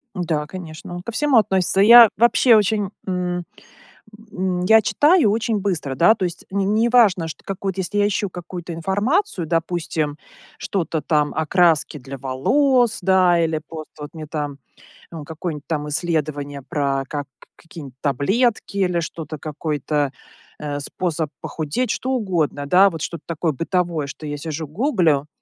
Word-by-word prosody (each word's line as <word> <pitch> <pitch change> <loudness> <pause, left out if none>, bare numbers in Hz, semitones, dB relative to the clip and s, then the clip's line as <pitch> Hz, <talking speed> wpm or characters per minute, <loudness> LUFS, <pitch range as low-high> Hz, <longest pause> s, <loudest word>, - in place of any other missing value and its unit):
Да, 165 -5 -2
конечно, 170 0 -9
он 175 - -6
ко 235 +4 -6
всему 290 +2 +2
относится. 190 -3 +2
Я 230 +3 +10
вообще, 235 0 +5
очень, 205 -1 +1 0.2
м, 180 -1 -2 0.9
м, 185 -1 -1
я 220 +4 +6
читаю 290 - +3
очень 225 0 0
быстро, 180 -9 -2
да, 170 +11 +5
то 195 - -3
есть 175 0 -5
не 195 0 0
не 215 +2 +2
неважно, 225 -8 +4
что 160 - -9
какой-то, 195 -1 -4
если 190 +3 -3
я 205 - +4
ищу 205 0 -1
какую-то 175 0 -7
информацию, 200 - 0
допустим, 165 -2 -2 0.4
что-то, 165 -4 -2
там, 150 0 +1
о 160 - -1
краске 165 -3 +2
для 135 +1 -8
волос, 235 - +2
да 185 -2 +4
или 160 -1 0
просто, 160 -2 -9
вот, 145 - -7
мне, 155 -1 -7
там, 145 -2 -4 0.5
э, 165 -3 -7
какое-нибудь, 160 -2 -6
там, 150 -2 -2
исследование 150 -3 -2
про 135 0 -1
как 145 -1 -5 0.3
какие-нибудь 150 -6 -11
таблетки 200 - 0
или 180 -3 +1
что-то 160 -1 -6
какой-то, 150 -1 -2 0.5
э, 145 -1 -4
способ 160 +1 -3
похудеть. 160 +9 -2
Что 260 - -2
угодно, 175 - -1
да, 185 +7 +5
вот, 165 -4 -7
что-то 170 -1 -5
такое 165 0 -1
бытовое, 165 0 -1
что 150 +2 -9
я 145 0 -4
сижу 160 +1 -5
гуглю. 165 - +1
170 Hz, 155 wpm, -21 LUFS, 150-200 Hz, 0.9 s, Я